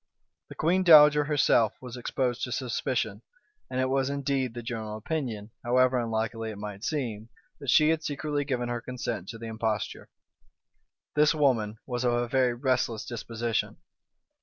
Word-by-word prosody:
The - - -10
queen 175 +4 +2
dowager 150 -4 +8
herself 140 -7 +3
was 125 -2 -8
exposed 125 0 -2
to 125 - -8
suspicion; 125 -1 -2 0.5
and 130 - -2
it 130 - +2
was 135 0 +1
indeed 135 -3 -1
the 120 - -6
general 110 -3 -4
opinion, 115 -4 -4
however 125 +1 +3
unlikely 115 0 -2
it 105 - -7
might 105 0 -7
seem, 120 -7 -3 0.3
that 140 -2 -5
she 155 +4 +5
had 160 -1 +1
secretly 145 0 -2
given 125 -4 -2
her 120 -1 -3
consent 120 -7 -5
to 115 - -6
the 115 - -8
imposture. 110 -2 -3 1.0
This 150 +1 +4
woman 115 -8 +1
was 125 -1 -3
of 120 -1 +2
a 120 0 0
very 125 -1 +2
restless 120 -3 0
disposition. 115 -1 -3
125 Hz, 160 wpm, -28 LUFS, 115-140 Hz, 1.0 s, dowager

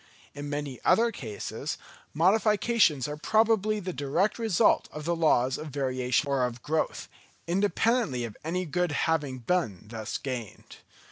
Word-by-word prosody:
In 145 0 -6
many 145 -3 -4
other 230 +1 +4
cases, 110 - -5 0.3
modifications 200 - +3
are 150 0 -5
probably 215 +3 +2
the 185 -2 -4
direct 155 - 0
result 220 -7 +3
of 150 0 -7
the 170 +1 +1
laws 130 -6 +2
of 155 - -6
variation 130 -1 0
or 135 -2 +1
of 120 -1 -3
growth, 155 +1 -1 0.4
independently 200 - +1
of 115 -3 -6
any 180 +4 -2
good 180 +1 0
having 150 -5 0
been 120 - -1
thus 110 -2 -4
gained. 125 -6 -7
150 Hz, 140 wpm, -28 LUFS, 130-190 Hz, 0.4 s, other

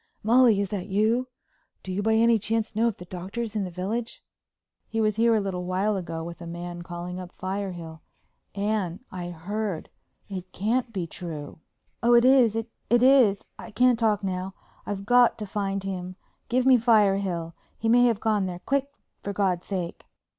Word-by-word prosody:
"Molly, 230 -1 +5
is 200 -1 -1
that 195 -2 -4
you? 220 +5 +1 0.6
Do 190 - -6
you 190 +2 -1
by 220 +1 +2
any 230 0 +4
chance 220 +1 -2
know 225 +2 +3
if 230 - -2
the 180 - -10
Doctor's 195 +6 -5
in 205 -2 0
the - - -5
village?" 205 +7 -4 0.6
"He 225 - -3
was 215 -1 +1
here 230 0 +4
a - - +3
little 190 -3 -3
while 190 +4 0
ago 165 -3 -4
with 170 +1 -8
a 170 - -7
man 175 +1 -6
calling 175 +1 -6
up 180 -1 -8
Firehill. 180 -4 -5 0.5
Anne, 200 -4 -1
I 175 -2 -5
heard—it 185 0 -6
can't 230 +5 0
be 190 -6 -3
true." 160 -3 -7 0.4
"Oh, 240 +1 +5
it 235 +1 +6
is—it 235 -4 +4 0.2
is—I 240 -4 +3
can't 250 +1 +3
talk 210 -3 +2
now. 190 0 -3 0.3
I've 200 -1 -4
got 245 +2 +5
to 210 - -5
find 195 -1 -2
him. 185 -1 -5 0.3
Give 250 +1 +2
me 260 -1 +7
Firehill. 195 -7 +2 0.2
He 225 - -2
may 245 +2 +6
have 230 -4 +2
gone 210 -4 +1
there. 180 -1 -6
Quick, 275 0 +1 0.3
for 200 - -4
God's 185 -3 0
sake!" 180 -4 -4
200 Hz, 175 wpm, -26 LUFS, 180-225 Hz, 0.6 s, me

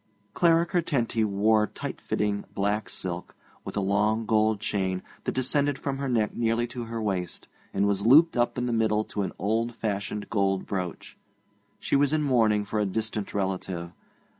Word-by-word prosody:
Clara 170 -1 +4
Curtenty 140 -10 0
wore 105 +1 +3
tight - - -6
fitting 100 -1 -1
black 100 +1 0
silk, 90 -1 -5 0.3
with - - -6
a - - +2
long 105 +3 +1
gold 110 -1 +2
chain 95 -2 -1 0.2
that - - -1
descended 140 +2 +1
from 140 -1 -3
her 140 -1 -2
neck 110 -4 +1
nearly 115 0 +1
to 120 0 -6
her 115 0 -4
waist, 95 -5 -3 0.2
and 100 - +1
was 100 -1 +1
looped 150 +9 +6
up 120 0 +1
in 125 - 0
the 120 - -1
middle 110 -1 +2
to 105 - -4
an 95 - -2
old 115 +4 0
fashioned 105 0 -3
gold 95 -3 +1
brooch. 90 -3 -5 0.6
She - - 0
was 145 +1 +3
in 155 -1 +2
mourning 110 -6 +3
for 105 +1 -2
a 105 - +2
distant 105 0 -3
relative. 95 -3 -2
110 Hz, 175 wpm, -27 LUFS, 100-120 Hz, 0.6 s, looped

